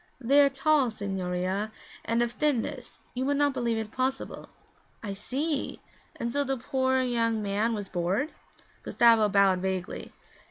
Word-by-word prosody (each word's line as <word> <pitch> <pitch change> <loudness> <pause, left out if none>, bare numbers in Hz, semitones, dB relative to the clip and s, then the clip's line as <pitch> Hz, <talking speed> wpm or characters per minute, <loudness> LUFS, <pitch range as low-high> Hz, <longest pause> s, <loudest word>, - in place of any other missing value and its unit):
'They 275 +3 +5
are 280 - +5
tall, 275 -1 +2
signorina, 195 -1 -2 0.3
and 230 +1 +1
of 240 - -2
a - - -12
thinness 290 -6 -2
you 255 - -2
would 285 +1 +1
not 290 -1 +3
believe 240 -3 0
it 220 -1 -4
possible.' 260 +2 -3 0.5
'I 205 -2 -3
see! 275 +8 -2 0.4
And 235 0 -3
so 285 - +2
the 270 -1 -1
poor 260 +1 +1
young 230 -3 0
man 210 +3 0
was 205 -2 -5
bored?' 185 - -1 0.5
Gustavo 230 -3 +4
bowed 195 -2 +4
vaguely. 185 -1 -3
235 Hz, 155 wpm, -28 LUFS, 200-265 Hz, 0.5 s, They